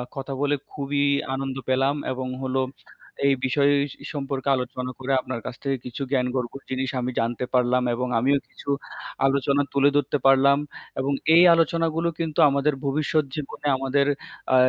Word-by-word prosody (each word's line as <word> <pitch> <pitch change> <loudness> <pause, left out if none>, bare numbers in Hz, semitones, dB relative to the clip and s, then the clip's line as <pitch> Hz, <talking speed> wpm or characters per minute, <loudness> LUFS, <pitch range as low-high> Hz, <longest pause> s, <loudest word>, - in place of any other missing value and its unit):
কথা 135 0 -5
বলে 145 0 +2 0.2
খুবই 140 0 -1 0.3
আনন্দ 135 -1 -3
পেলাম 135 +2 +2 0.2
এবং 130 0 -3 0.2
হলো 130 0 0 0.7
এই 140 - +4
বিষয় 140 +2 +3 0.2
সি - - -16
সম্পর্কে 135 -1 -2
আলোচনা 125 0 -4
করে 130 +1 -3
আপনার 130 -2 -5
কাছ - - -5
থেকে 135 -1 0
কিছু 125 +3 -6
জ্ঞানগর্ভ 125 -2 0 0.2
জিনিস 130 0 -2
আমি 125 - -2
জানতে 120 +2 -1
পারলাম 125 0 +3
এবং 125 +1 -2
আমিও 140 +4 +3
কিছু - - -10 0.6
আলোচনা 140 +1 +2
তুলে 140 0 +4
ধরতে 145 0 +1
পারলাম। 135 +1 +6 0.4
এবং 135 +2 0 0.2
এই 175 - +8
আলোচনাগুলো 165 0 +1
কিন্তু 165 -1 -2
আমাদের 140 +1 +1
ভবিষ্যৎ 155 +2 +1
জীবনে 145 0 -5
আমাদের 135 +1 +1 0.5
আ - - +6
135 Hz, 155 wpm, -24 LUFS, 130-145 Hz, 0.7 s, এই